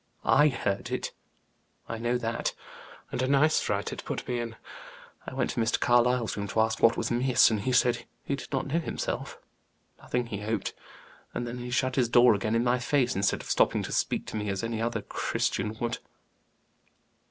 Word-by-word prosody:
I 150 +1 +6
heard 100 -8 -1
it, - - -3 0.8
I 115 - -4
know 120 +1 +1
that, 115 -1 -2 0.6
and - - -2
a 130 - +1
nice 145 +3 +4
fright 100 -1 -1
it - - -7
put - - -5
me 125 -1 -1
in. 115 -1 -4 0.7
I - - -6
went - - 0
to - - -3
Mr. 115 +1 +1
Carlyle's 120 -1 +3
room 100 0 -3
to 105 - -1
ask 110 0 0
what 115 - +5
was 115 - -1
amiss, 125 0 +4
and 110 - 0
he 130 - -1
said 125 -1 +2 0.2
he 140 - -1
did - - -9
not 135 -2 -1
know 150 +5 0
himself 165 - -4 0.6
nothing, 125 0 -2
he 105 -4 -5
hoped. 105 -1 -2 0.6
And 120 - -2
then 120 +1 -5
he 125 0 -6
shut 130 +1 0
his 125 -3 +3
door 120 0 +7
again 110 +2 -1
in 115 - +2
my 125 +1 +2
face, 125 0 +1
instead 100 +1 +1
of - - -10
stopping - - +3
to - - -5
speak - - 0
to - - -7
me 105 -1 -2
as 100 +2 -2
any 115 -1 -2
other 120 +1 -1
Christian 105 +3 -2
would." 120 -1 -2
120 Hz, 200 wpm, -28 LUFS, 110-125 Hz, 0.8 s, door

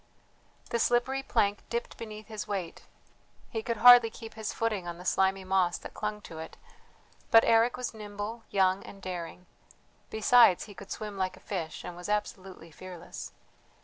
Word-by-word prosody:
The 235 - +1
slippery 245 +4 +2
plank 210 -6 +1
dipped 235 0 -3
beneath 215 -1 -8
his 215 -2 -6
weight; 190 -5 -4 0.7
he 225 - -2
could 230 +1 -2
hardly 245 0 +9
keep 225 0 -10
his 220 -1 -4
footing 215 -6 -2
on 170 0 -5
the 180 - -11
slimy 190 0 +2
moss 185 -2 +1
that - - -10
clung 210 0 -4
to 160 -5 -10
it. 160 - -8 0.7
But 225 0 +7
Eric 230 +2 +4
was 250 -2 -4
nimble, 210 +1 -6
young, 190 -1 +2
and 200 - -11
daring; 180 -1 -6 0.6
besides, 220 -3 +5
he 205 - -11
could 195 +1 -12
swim 210 -2 -5
like 185 0 -1
a - - -15
fish, 170 -6 -5
and 175 - -7
was 180 +3 -8
absolutely 190 -5 -3
fearless. 180 +1 -9
205 Hz, 170 wpm, -29 LUFS, 185-225 Hz, 0.7 s, hardly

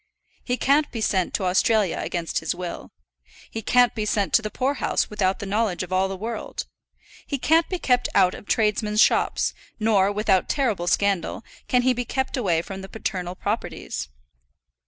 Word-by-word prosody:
He 250 0 -1
can't 290 +4 +3
be 230 - -4
sent 190 -4 +1
to - - -1
Australia 190 +1 +2
against 170 -2 -2
his - - -2
will. 180 -1 -6 0.6
He 225 - -4
can't 245 +2 +4
be 215 - -2
sent 205 -2 0
to - - +6
the 215 - -4
poor 260 +6 0
house - - 0
without 195 -2 +1
the 205 - -6
knowledge 200 -2 0
of 185 0 -6
all 190 +1 +2
the 190 0 -5
world. 225 +4 -5 0.6
He 280 - -2
can't 320 +5 +3
be 370 - -1
kept 250 -7 +1
out 180 - +5
of - - -10
tradesmen's 210 -1 +1
shops; - - +3 0.3
nor, 205 -3 +3
without 205 -3 +1
terrible 225 -11 0
scandal, 200 +3 0 0.2
can 250 -1 +2
he 255 0 +4
be 245 0 -2
kept 265 +3 -2
away 175 -10 +1
from 195 0 -7
the 190 - -9
paternal 185 -4 -4
properties. 190 - -4
210 Hz, 180 wpm, -24 LUFS, 190-240 Hz, 0.6 s, to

